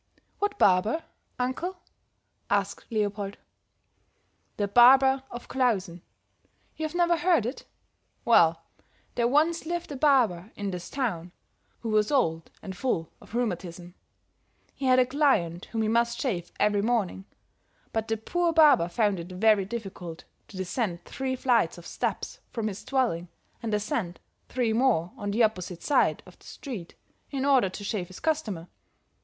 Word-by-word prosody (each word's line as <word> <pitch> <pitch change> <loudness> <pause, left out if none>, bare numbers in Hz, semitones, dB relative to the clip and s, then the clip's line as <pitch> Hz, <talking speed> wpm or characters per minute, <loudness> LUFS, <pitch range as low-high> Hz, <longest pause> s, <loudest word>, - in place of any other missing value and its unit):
"What 410 0 -1
barber, 205 - +3 0.3
uncle?" 260 +9 -2 0.7
asked 200 -1 -1
Leopold. 205 -2 -2 1.2
"The 205 - 0
barber 265 +5 +6
of 240 - -8
Klausen. 195 -10 0 0.7
You've 315 +1 -4
never 345 -1 +3
heard 330 - +3
it? 250 +4 -5 0.6
Well, 165 -8 +5 0.5
there 235 -1 +1
once 315 +5 +2
lived 345 -1 -3
a - - -4
barber 240 - +2
in 200 -1 -3
this 180 -1 -6
town 190 -11 -2 0.5
who 230 - -4
was 215 -1 +2
old 165 - +1
and 190 -2 -6
full 180 -8 -2
of - - -11
rheumatism; 180 -6 -3 0.8
he 275 - -5
had 255 0 +5
a 255 - +5
client 245 - +1
whom 225 -1 -2
he - - 0
must 235 +1 +1
shave 190 -11 -2
every 205 -1 +3
morning; 205 -4 -1 0.7
but 225 0 -1
the 225 - 0
poor 345 +10 0
barber 300 - +6
found 205 +1 +1
it 170 +2 -8
very 205 +1 +3
difficult 190 -6 -7 0.2
to 195 - -11
descend 185 -1 -2
three 265 -1 -3
flights 240 -10 +2
of 175 - -12
steps - - -3
from 220 -2 -2
his 195 - -8
dwelling 235 -11 0 0.3
and 225 - -3
ascend 210 -3 -2 0.3
three 240 -3 0
more 220 -8 +2
on 205 - -4
the 225 +4 +2
opposite 185 -5 -1
side 290 - +2
of - - -17
the - - -20
street, 220 - -8 0.3
in 275 -1 -2
order 265 -8 +4
to 195 +2 -8
shave 200 -3 -2
his 185 - -11
customer. 220 - -2
220 Hz, 150 wpm, -27 LUFS, 185-260 Hz, 1.2 s, barber